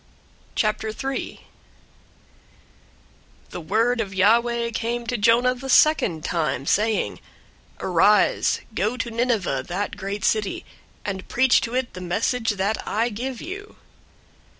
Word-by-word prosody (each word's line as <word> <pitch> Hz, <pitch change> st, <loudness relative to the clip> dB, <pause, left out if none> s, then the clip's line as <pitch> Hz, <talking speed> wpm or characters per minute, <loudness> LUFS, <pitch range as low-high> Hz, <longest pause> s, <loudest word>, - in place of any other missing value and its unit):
003:001 220 Hz, +5 st, -2 dB, 2.1 s
The 175 Hz, -, -6 dB
word 225 Hz, +8 st, +1 dB
of 195 Hz, -3 st, -5 dB
Yahweh 235 Hz, +4 st, +3 dB
came 235 Hz, +1 st, -2 dB
to 245 Hz, -, -2 dB
Jonah 235 Hz, +3 st, +4 dB
the 260 Hz, +2 st, -8 dB
second 215 Hz, -, +4 dB
time, 155 Hz, -5 st, -1 dB
saying, 215 Hz, +6 st, +1 dB, 0.6 s
003:002 -, -, -28 dB
"Arise, 190 Hz, +3 st, +3 dB
go 215 Hz, +5 st, -1 dB
to 235 Hz, -1 st, -3 dB
Nineveh, 225 Hz, -, 0 dB
that 195 Hz, +4 st, -3 dB
great 200 Hz, 0 st, -4 dB
city, 215 Hz, -3 st, 0 dB, 0.4 s
and 190 Hz, -2 st, -4 dB
preach 260 Hz, 0 st, +3 dB
to 235 Hz, +2 st, -4 dB
it 255 Hz, -1 st, -1 dB
the 185 Hz, -, -8 dB
message 225 Hz, +6 st, -1 dB
that 200 Hz, +3 st, 0 dB
I 225 Hz, +3 st, 0 dB
give 240 Hz, +3 st, -5 dB
you." 400 Hz, +4 st, -8 dB
225 Hz, 125 wpm, -23 LUFS, 195-240 Hz, 2.1 s, Jonah